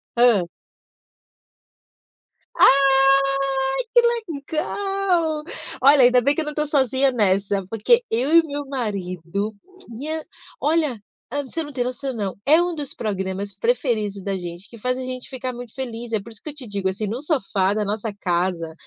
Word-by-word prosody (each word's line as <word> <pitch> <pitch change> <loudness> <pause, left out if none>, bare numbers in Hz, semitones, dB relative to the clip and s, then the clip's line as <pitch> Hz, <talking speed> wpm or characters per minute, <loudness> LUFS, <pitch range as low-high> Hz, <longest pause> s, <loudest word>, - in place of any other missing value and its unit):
Hã. 235 -7 +4 2.1
Ai, 275 0 +5 0.7
que 480 - +7 0.5
legal! 360 -3 0 0.4
Olha, 275 +1 +7
ainda 245 0 +6
bem 280 +4 +3
que - - 0
eu 310 - -4
não 300 - -3
estou 300 0 -1
sozinha 270 -1 +2
nessa, 195 -3 +1
porque 225 - +3
eu 260 +7 0
e - - +10
o 325 - -10
meu 285 0 -4
marido, 200 - -3 0.4
minha 305 +7 -4 0.4
olha, 300 -7 +1 0.3
ah, 285 +4 -2
você 325 +5 -4
não 295 - -8
tem 250 -2 0
noção, 260 +2 -3
não. 200 -5 -3
É 315 +4 +6
um 350 -1 -1
dos 290 -3 -5
programas 195 -1 -3
preferidos 220 - -1
da 195 -1 -2
gente, 175 +1 -7
que 235 - -12
faz 250 +3 -1
a - - -4
gente 255 -1 -5
ficar 255 -1 -4
muito 240 -2 -9
feliz. 240 -3 -6
É 220 - +2
por 230 - -12
isso 220 - -12
que 305 - -6
eu - - -6
te 275 -5 -5
digo, 200 -2 -1
assim, 200 +3 -2
no 225 +5 -3
sofá 200 - 0
da 210 0 0
nossa 210 +1 -3
casa, 175 -3 -1
245 Hz, 170 wpm, -22 LUFS, 200-285 Hz, 2.1 s, e